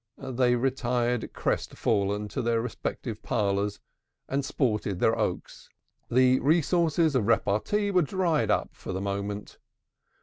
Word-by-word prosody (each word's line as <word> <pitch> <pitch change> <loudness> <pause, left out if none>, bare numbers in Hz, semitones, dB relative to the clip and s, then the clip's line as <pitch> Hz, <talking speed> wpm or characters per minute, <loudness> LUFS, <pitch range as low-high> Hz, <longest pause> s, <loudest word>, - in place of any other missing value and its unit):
They 125 -2 +1
retired 125 -2 0
crestfallen 105 -1 -1
to - - -3
their 115 -1 +1
respective 115 0 -4
parlors, 100 0 -1 0.5
and 140 +1 -1
sported 105 -8 -1
their - - +3
oaks. - - -4 0.4
The 130 +1 +4
resources 165 +1 +2
of 120 -6 +1
repartee 115 - +1
were 185 -2 +4
dried 170 0 0
up - - +1
for - - -7
the 95 - -2
moment. 100 +1 -4
125 Hz, 125 wpm, -27 LUFS, 105-140 Hz, 0.5 s, The